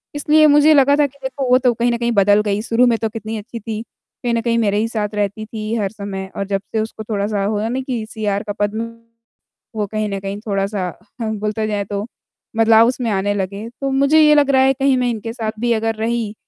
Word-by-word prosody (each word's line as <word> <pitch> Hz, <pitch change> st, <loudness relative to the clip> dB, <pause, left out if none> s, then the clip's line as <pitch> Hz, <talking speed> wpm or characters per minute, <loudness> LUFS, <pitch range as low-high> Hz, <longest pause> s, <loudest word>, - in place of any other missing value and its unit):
इसलिए 305 Hz, +1 st, +4 dB
मुझे 305 Hz, +1 st, +6 dB
लगा 280 Hz, 0 st, +5 dB
था 290 Hz, -, +4 dB
कि 280 Hz, +1 st, -22 dB
देखो 265 Hz, -1 st, -3 dB
वो 250 Hz, -, +6 dB
तो 250 Hz, -2 st, +2 dB
कहीं 240 Hz, +1 st, +1 dB
न 235 Hz, -, 0 dB
कहीं 235 Hz, 0 st, 0 dB
बदल 205 Hz, 0 st, +4 dB
गई, 205 Hz, 0 st, 0 dB
शुरू 235 Hz, +2 st, +2 dB
में 230 Hz, -1 st, +2 dB
तो 225 Hz, -, -1 dB
कितनी 220 Hz, 0 st, -5 dB
अच्छी 230 Hz, +2 st, -8 dB
थी। 220 Hz, 0 st, -5 dB, 0.4 s
कहीं 240 Hz, -1 st, 0 dB
न 230 Hz, -, +1 dB
कहीं 230 Hz, 0 st, 0 dB
मेरे 205 Hz, -2 st, +1 dB
ही 220 Hz, +2 st, +1 dB
साथ 215 Hz, -3 st, -2 dB
रहती 205 Hz, +1 st, -2 dB
थी 215 Hz, 0 st, -5 dB
हर 200 Hz, -3 st, -1 dB
समय 200 Hz, -2 st, -6 dB
और 195 Hz, -, -2 dB
जब 195 Hz, -1 st, -1 dB
से 220 Hz, -, +1 dB
उसको 220 Hz, 0 st, -6 dB
थोड़ा-सा 205 Hz, -1 st, -1 dB
हुआ 210 Hz, +1 st, -1 dB
नहीं 260 Hz, +2 st, -2 dB
कि 240 Hz, -4 st, -3 dB
सीआर 205 Hz, -2 st, -2 dB
का 205 Hz, -2 st, -4 dB
पद 205 Hz, 0 st, 0 dB, 1.0 s
वो 210 Hz, -1 st, -1 dB
कहीं 215 Hz, 0 st, -2 dB
न 195 Hz, 0 st, -3 dB
कहीं 195 Hz, +1 st, -5 dB
थोड़ा-सा 195 Hz, -2 st, -1 dB, 0.3 s
बोलते 215 Hz, 0 st, -2 dB
जाए 205 Hz, -1 st, -1 dB
तो 205 Hz, +1 st, -4 dB, 0.5 s
बदलाव 225 Hz, 0 st, +6 dB
उसमें 245 Hz, -2 st, -1 dB
आने 200 Hz, +1 st, 0 dB
लगे। 200 Hz, +2 st, -4 dB
तो 275 Hz, -, 0 dB
मुझे 280 Hz, +4 st, +4 dB
ये 300 Hz, 0 st, +6 dB
लग 285 Hz, -1 st, +4 dB
रहा 265 Hz, -1 st, +4 dB
है 270 Hz, 0 st, +4 dB
कहीं 270 Hz, -1 st, +2 dB
मैं 250 Hz, -1 st, +1 dB
इनके 225 Hz, 0 st, -4 dB
साथ 220 Hz, -3 st, -3 dB
भी 240 Hz, 0 st, 0 dB
अगर 225 Hz, 0 st, -1 dB
रही 225 Hz, -1 st, -2 dB
220 Hz, 235 wpm, -19 LUFS, 205-245 Hz, 1.0 s, मुझे